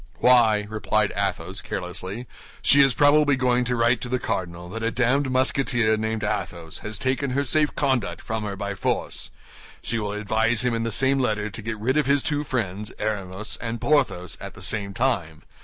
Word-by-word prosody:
"Why," 115 -4 +4
replied 110 -1 0
Athos, 100 0 -2
carelessly, 95 +6 -5 0.4
"she 140 - +7
is 135 -2 +4
probably 145 0 +5
going 125 -1 +2
to 125 0 +1
write 120 0 +2
to 125 - -5
the 125 - +1
cardinal 90 -7 -4
that 115 +4 -6
a 115 - +1
damned 130 +3 +1
Musketeer, 130 -3 +2
named 110 -1 -2
Athos, 90 -5 -3
has 105 -1 -5
taken 130 +3 -1
her 140 +2 +1
safe 150 +2 +2
conduct 120 -11 0
from 110 0 -4
her 100 -2 -4
by 100 0 -4
force; 95 - -2 0.5
she 115 - -1
will 105 -1 -3
advise 110 +3 +1
him 125 -1 +1
in 115 - -1
the 115 0 -2
same 135 +5 +3
letter 110 -4 -1
to 100 - -6
get 110 +1 -4
rid 125 +7 0
of 150 - +2
his 140 0 +3
two 150 -2 0
friends, 105 -6 -3
Aramis 100 0 -3
and 115 0 -4
Porthos, 130 - 0
at - - -8
the - - -11
same 100 -2 0
time. 95 -12 -1
115 Hz, 190 wpm, -24 LUFS, 105-130 Hz, 0.5 s, she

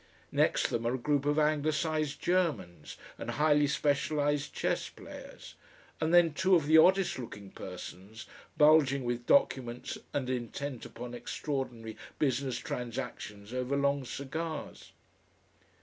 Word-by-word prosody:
Next - - +2
them 115 0 -1
are 120 - +1
a - - -1
group 145 +2 0
of 145 +1 +2
anglicised 155 0 +1
Germans 150 - -1 0.2
and - - -5
highly 150 -1 +3
specialised 145 0 0
chess - - -1
players, - - -11 0.5
and 160 0 0
then 175 -3 +6
two 185 +4 +4
of 160 -4 +2
the 160 +2 +7
oddest 190 -2 +4
looking 100 -5 -8
persons 95 +4 -9 0.3
bulging 150 -3 +5
with 120 0 -3
documents 125 -3 +1
and 135 -3 -2
intent 130 +1 -4
upon 120 +1 -8
extraordinary 120 -2 -4 0.2
business 130 -3 0
transactions 120 -4 -6
over 130 +2 -1
long 140 0 +1
cigars.... 155 +5 -5
140 Hz, 125 wpm, -31 LUFS, 120-150 Hz, 0.5 s, the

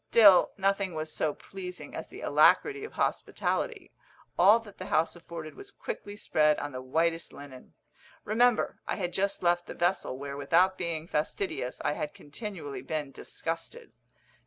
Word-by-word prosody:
Still 205 -6 +8
nothing 195 -2 +1
was 155 0 -3
so 155 -2 0
pleasing 185 -2 -8
as - - -6
the - - -11
alacrity 415 0 +4
of 440 - -7
hospitality - - -1 0.4
all 200 +5 +7
that 205 -3 -14
the 185 - -6
house 160 0 +2
afforded 165 -2 -8
was 400 - -9
quickly 205 - -6
spread 150 -7 +3
on 145 - -4
the 130 -1 -6
whitest 165 +5 0
linen. 135 -3 -12 0.5
Remember, 235 +2 +2
I - - 0
had 180 -3 -3
just 195 +1 0
left 175 0 +2
the - - -7
vessel, 175 -6 0
where, 140 0 -6
without 170 +7 +3
being 170 -3 -3
fastidious, 150 -4 -2
I - - +3
had 150 0 -4
continually 160 -2 -7
been 150 -3 -3
disgusted. 165 +4 -5
170 Hz, 160 wpm, -29 LUFS, 150-195 Hz, 0.5 s, Still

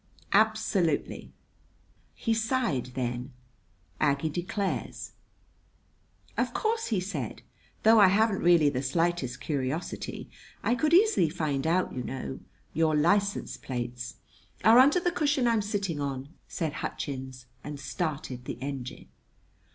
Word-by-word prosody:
"Absolutely!" 210 -6 +1 0.8
He 230 - 0
sighed 225 - 0
then, 125 +1 -3 0.7
Aggie 145 +1 +2
declares. 185 +4 -3 1.3
"Of - - 0
course," 450 0 0
he 215 -5 +1
said, 175 - -5 0.4
"though 220 +1 +7
I 200 - +8
haven't 205 +2 +3
really 170 -4 +5
the 130 - -2
slightest 140 -2 0
curiosity, 140 +2 -3 0.4
I 235 - +2
could 305 +7 +3
easily 400 - +5
find 150 -3 -1
out, 180 +3 +1
you 130 - -3
know. 130 +1 -5 0.3
Your 160 0 +2
license 200 +7 +1
plates 125 0 -5 0.2
" - - -27
"Are 225 +2 +8
under 285 +7 +6
the 350 0 0
cushion 290 -6 +1
I'm 230 -2 +3
sitting 200 -6 -2
on," 140 -1 -3 0.2
said 160 -4 -3
Hutchins, 130 -2 -5 0.2
and 150 -1 -6
started 135 -3 -4
the - - -5
engine. 130 -2 -6
165 Hz, 125 wpm, -28 LUFS, 135-215 Hz, 1.3 s, I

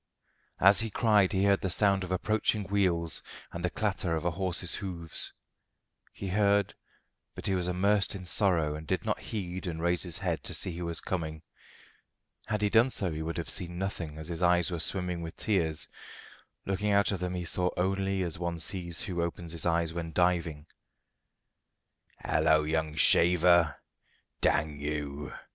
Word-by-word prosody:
As 100 +2 +6
he 115 -1 0
cried 105 -3 +3
he 95 -2 +1
heard 100 -1 +3
the 95 - -1
sound 100 +1 +2
of 90 - -6
approaching 105 +2 0
wheels 90 -4 0 0.3
and 85 - -6
the 90 - +1
clatter 95 -5 -1
of 80 +1 -4
a 85 - +2
horse's 90 0 0
hoofs. 85 -5 -5 0.8
He 95 - -6
heard, 100 0 +2 0.6
but - - -8
he 95 - +1
was 90 -1 -1
immersed 100 +3 +1
in 95 -2 -7
sorrow 85 -5 +2
and 75 +1 -8
did - - -1
not - - -1
heed 95 -3 -5
and 80 -2 -4
raise 85 +1 +1
his 85 -4 -3
head - - -2
to - - -1
see 90 - -1
who 85 0 -4
was 85 -1 -1
coming. 80 -3 -4 1.0
Had 105 0 -1
he 105 - +3
done 115 +3 +5
so 95 -8 -1
he 80 0 -4
would 80 +2 -4
have 85 - -2
seen 90 -3 -1
nothing, 90 -5 -4
as 80 -1 -6
his 85 0 -3
eyes 90 0 +3
were 85 - -3
swimming 90 0 0
with 80 -1 -7
tears. 80 -7 +1 0.8
Looking 100 +2 -1
out 100 +1 +3
of 100 - -2
them 90 0 -3
he 90 -1 -3
saw 90 +1 +2
only 95 +1 0
as 85 -2 -3
one 85 -1 -3
sees 85 0 +1
who 90 -5 -2
opens 85 0 -4
his 85 0 +1
eyes 85 -1 +1
when 85 -1 -5
diving. 85 -4 0 1.6
"Halloa, 80 -1 +3
young 80 -1 -1
shaver! 85 0 +5 0.7
Dang 75 0 +1
you! 75 0 -4
90 Hz, 175 wpm, -29 LUFS, 80-95 Hz, 1.6 s, As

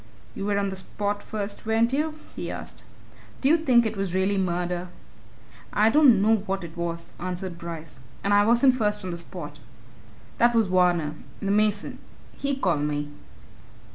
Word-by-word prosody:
"You 195 - -4
were 205 -1 +1
on 200 -1 0
the 190 - -5
spot 205 +2 -3
first, 205 0 -5
weren't 225 +2 +2
you?" 305 +2 0 0.2
he - - -4
asked: - - -6 0.5
"Do 265 - +2
you 320 - +7
think 255 -7 +4
it 220 0 -1
really 195 0 0
was 190 - +1
murder?" 180 0 -2 0.9
"I 215 +2 +4
don't 250 -8 +6
know 220 +1 +5
what 195 -2 -3
it 165 0 -9
was," 170 -1 -4
answered 180 -1 -4
Bryce. 165 -4 -8 0.2
"And 200 - +2
I 205 0 +6
wasn't 240 +4 +5
first 210 -5 0
on 180 - -3
the 170 - -4
spot. 165 -4 -8 0.8
That 240 0 +4
was 225 -1 +4
Varner, 180 -4 +2 0.3
the 200 - -1
mason 210 0 +1 0.4
he 280 0 -1
called 180 - +1
me." 145 0 -2
200 Hz, 170 wpm, -25 LUFS, 175-220 Hz, 0.9 s, you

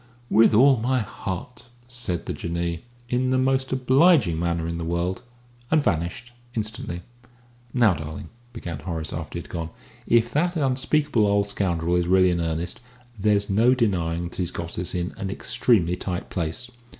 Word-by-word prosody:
"With 110 +1 +6
all 135 +3 +6
my 125 +4 +1
heart," 105 +4 -6 0.2
said 120 -9 -4
the - - -3
Jinnee, 85 +1 -3 0.2
in 125 +1 0
the 130 - +2
most 130 0 +1
obliging 130 - +4
manner 85 -1 -1
in 85 0 -3
the - - -3
world, 85 +2 -1 0.5
and 155 -2 +3
vanished 90 - -1 0.2
instantly. 110 -5 -4 0.7
"Now, 115 -6 +4
darling," 80 0 -7 0.2
began 85 -10 -6
Horace, 80 0 -4
after 80 +1 -5
he - - -3
had - - -15
gone, 85 -2 -4 0.4
"if 120 0 +3
that 175 +4 +1
unspeakable 135 -4 +2
old 100 0 +2
scoundrel 90 -4 0
is 90 -1 +1
really 95 0 +5
in 85 -1 0
earnest, 80 +6 -3 0.4
there's 100 0 +2
no 115 +6 +4
denying 90 -8 0
that - - -11
he's 90 -3 -1
got 85 -1 -5
us 90 - -3
in 90 0 -2
an 95 - -4
extremely 95 -3 +1
tight 90 0 -5
place. 85 +8 -3
95 Hz, 165 wpm, -24 LUFS, 85-125 Hz, 0.7 s, With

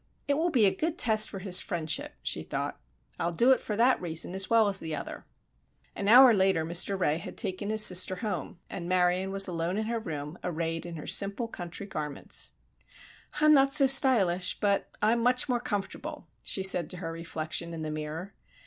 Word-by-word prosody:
"It 285 - +2
will 320 +5 0
be 250 -10 +3
a 190 - +3
good 320 - -2
test 215 -6 +4
for 195 - -7
his 190 -1 +3
friendship," 160 -3 -3
she - - -2
thought. - - -5 0.4
"I'll 170 - -1
do 235 +10 +3
it 260 - +4
for 210 - -4
that 240 +4 +3
reason 170 0 -3
as 190 0 -1
well 225 -2 +4
as 200 - 0
the 160 -1 -5
other." - - -8 0.7
An 200 - -4
hour 250 +2 +8
later 190 -5 +2
Mr. 175 +4 -1
Ray 155 -3 +1
had 180 - -9
taken 200 -1 -3
his 215 0 +4
sister 185 +1 +4
home 205 -1 -5
and 175 -1 -7
Marion 180 +1 +1
was 195 0 +1
alone 170 +1 -3
in 220 - -2
her 230 +1 -2
room 150 -5 -7
arrayed 165 -1 -3
in 170 - -7
her 155 - -8
simple, 200 +4 +2
country 175 -2 -8
garments. 150 -7 -5 0.9
"I'm 305 0 +6
not 275 -1 +4
so 280 -2 +5
stylish, 230 - +2
but 200 -1 0
I'm 230 +2 +3
much 250 +3 +3
more 245 -2 0
comfortable," 205 -5 -5 0.2
she 190 - 0
said 180 -4 +3
to 180 - -5
her 165 -2 -5
reflection 165 0 -4
in 165 -1 -6
the 155 - -4
mirror. 155 +5 -6
190 Hz, 200 wpm, -28 LUFS, 170-225 Hz, 0.9 s, hour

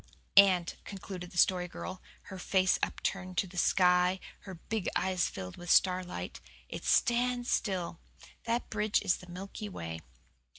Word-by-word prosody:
"And," 185 -3 +6
concluded 185 -2 -7
the 180 - -11
Story 180 0 +3
Girl, 185 +1 -7 0.2
her 190 -2 -9
face 190 +1 +2
upturned 185 -2 -3
to - - +2
the 185 0 -13
sky 180 0 +4
and 190 - -9 0.3
her 190 - -7
big 205 +4 -3
eyes 185 0 +1
filled 90 -1 -7
with 175 0 -9
starlight, 180 - +1 0.3
"it - - -6
stands 245 +1 +2
still. 180 -5 -1 0.5
That 235 +1 -1
bridge 210 0 +1
is 180 - +2
the 180 - -14
Milky 195 +3 -7
Way." 80 - -6
185 Hz, 155 wpm, -31 LUFS, 180-200 Hz, 0.5 s, And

